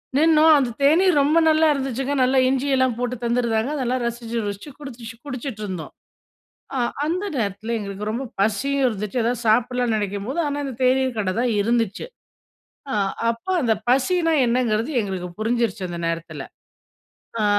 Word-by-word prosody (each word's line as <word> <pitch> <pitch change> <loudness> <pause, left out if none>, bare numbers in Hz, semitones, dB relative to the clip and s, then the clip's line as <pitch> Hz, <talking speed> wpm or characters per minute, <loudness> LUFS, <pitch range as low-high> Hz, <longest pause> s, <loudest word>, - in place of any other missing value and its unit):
நின்னோம். 315 +1 +6
அந்த 265 -4 +1
தேநீர் 325 +3 +4
ரொம்ப 300 +4 +3
நல்லா 315 +1 +4
இருந்துச்சுங்க. 270 0 -2
நல்லா 260 +1 +2
இஞ்சி 270 +1 0
எல்லாம் 260 -2 +2
போட்டு 250 0 -2
தந்துருந்தாங்க. 235 +1 0
அதெல்லாம் 255 -2 -1
ரசிச்சு 235 0 -4
ருசிச்சு 205 +7 -5
குடிச் 240 -5 -8
குடிச்சிட்டு 255 -4 -5
இருந்தோம். 185 -5 -6 0.8
ஆ - - 0 0.3
அந்த 355 +6 -1
நேரத்தில 220 0 -2
எங்களுக்கு 200 0 -5
ரொம்ப 240 +5 -3 0.2
பசியும் 265 +7 +1
இருந்துச்சு. 210 +1 -2
எதாவது 240 +1 -1
சாப்பிட்லான்னு 240 0 +2
நினைக்கும்போது, 205 - -3
ஆனா 290 0 -2
இந்த 270 -3 -5
தேநீர் 260 -1 +2
கட 195 -3 0
தான் 245 - +1
இருந்துச்சு. 230 - 0 0.9
ஆ, - - -2 0.4
அப்ப 230 +5 -5
அந்த 230 -4 +3
பசின்னா 330 +6 +2
என்னங்கிறது 235 +1 0
எங்களுக்கு 190 -4 -3
புரிஞ்சிருச்சு 225 -3 0
அந்த 175 - -6
நேரத்தில. 165 0 -4 1.0
ஆ, - - +2
245 Hz, 145 wpm, -22 LUFS, 220-270 Hz, 1.0 s, நின்னோம்